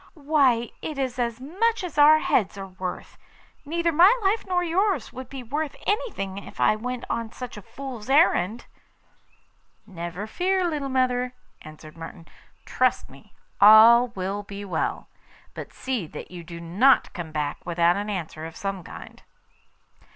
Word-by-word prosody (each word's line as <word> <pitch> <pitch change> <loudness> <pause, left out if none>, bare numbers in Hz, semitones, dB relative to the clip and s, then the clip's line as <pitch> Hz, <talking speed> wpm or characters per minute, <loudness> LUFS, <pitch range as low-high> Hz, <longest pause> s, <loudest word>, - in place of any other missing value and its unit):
Why, 280 -6 +2
it 305 - -5
is 260 -2 -2
as 235 -1 -1
much 380 - -1
as 330 -5 -4
our 300 +2 +8
heads 210 -9 0
are 195 - -6
worth. 185 -1 -7 0.5
Neither 335 +3 0
my 345 +6 +7
life 395 +3 +1
nor 360 -1 +1
yours 355 - 0
would 260 -1 -8
be 270 -2 -7
worth 290 +5 -3
anything 200 - -2
if - - -13
I - - +4
went 250 +3 -5
on 230 -1 -3
such 250 +1 -8
a 210 - -9
fool's 255 0 -9
errand.' 240 - +3 1.2
'Never 175 +2 -6
fear, 365 +9 0
little 295 -4 -3
mother,' 250 -1 0 0.3
answered 155 0 -12
Martin. 165 0 -10 0.4
'Trust - - 0
me; - - -18 0.3
all 225 +4 +8
will 195 +2 -3
be 200 0 -8
well. 175 -5 -2 0.5
But - - -8
see 250 -10 -3
that - - -10
you 175 -1 -8
do 170 0 -9
not 200 +11 +3
come 170 -3 -6
back 150 -2 -3
without 170 0 +2
an 205 +1 -3
answer 160 -5 -5
of 165 - -12
some 195 -2 -4
kind. - - -11
235 Hz, 160 wpm, -25 LUFS, 185-290 Hz, 1.2 s, our